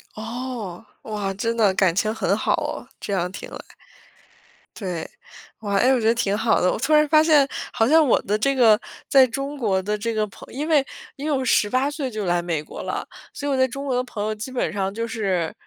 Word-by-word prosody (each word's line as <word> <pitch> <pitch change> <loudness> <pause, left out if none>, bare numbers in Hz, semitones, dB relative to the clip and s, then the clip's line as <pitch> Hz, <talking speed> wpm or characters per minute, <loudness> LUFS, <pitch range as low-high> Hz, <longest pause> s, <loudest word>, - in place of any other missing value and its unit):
哦， 225 -3 -6 0.2
哇， 205 -3 -3
真 230 +4 -1
的 210 -4 +3
感 185 -3 +2
情 215 +2 +1
很 225 - 0
好 - - +1
哦， - - -6
这 200 - -4
样 180 -1 -1
听 - - -8
来。 - - -11 1.0
对。 180 -6 -4 0.5
哇， 205 -2 -2
诶， 255 +5 +4
我 250 - +2
觉 220 - +1
得 230 - +4
挺 205 -4 0
好 225 - +2
的。 180 - +3
我 - - -2
突 285 +6 +1
然 300 0 +5
发 310 +1 +5
现， 300 -4 +5 0.2
好 225 -1 +2
像 315 +1 +5
我 250 - +3
的 210 +2 0
这 275 +5 +1
个 225 -4 +5 0.3
在 265 -2 +6
中 275 +4 -4
国 200 -7 +1
的 210 +2 -2
这 230 +2 -2
个 215 -1 +1
朋 - - -14
因 295 +4 -3
为 295 -4 +3 0.3
因 280 - -7
为 - - 0
我 260 - -2
18 255 +6 +2
岁 290 -3 -3
就 215 -3 -4
来 175 -1 +1
美 165 -3 -2
国 - - -9
了， - - -4 0.3
所 285 - -5
以 285 - 0
我 - - +2
在 260 0 +4
中 275 +3 -6
国 260 -3 0
的 250 - +1
朋 225 -5 -5
友 215 0 -1
基 215 +4 -6
本 255 - -1
上 195 -1 -2
就 230 +1 -3
是， 195 -6 -1
225 Hz, 250 characters per minute, -23 LUFS, 200-265 Hz, 1.0 s, 在